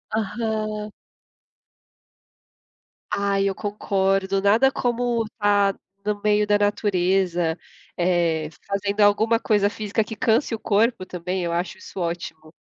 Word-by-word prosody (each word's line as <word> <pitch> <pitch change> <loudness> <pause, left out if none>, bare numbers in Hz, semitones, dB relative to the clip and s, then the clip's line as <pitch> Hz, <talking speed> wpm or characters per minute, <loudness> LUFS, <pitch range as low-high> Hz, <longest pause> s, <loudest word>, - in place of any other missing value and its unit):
Aham. 215 -1 -2 2.2
Ai, 200 -1 +1
eu 190 - -4
concordo, 195 -2 0
nada 225 +7 +4
como 240 -1 0
estar 205 -2 +1 0.3
no 210 -1 -1
meio 210 0 +3
da 205 0 +3
natureza, 185 -4 +1 0.4
eh, 170 -3 +1 0.2
fazendo 200 +1 -1
alguma 220 +3 +4
coisa 205 -4 +2
física 215 +1 -1
que 220 - -8
canse 230 +3 +1
o 220 - -3
corpo 215 -2 +1
também, 180 +1 -3
eu 170 - -2
acho 175 +1 -2
isso 190 - -9
ótimo. 170 -2 -5
205 Hz, 120 wpm, -23 LUFS, 185-215 Hz, 2.2 s, nada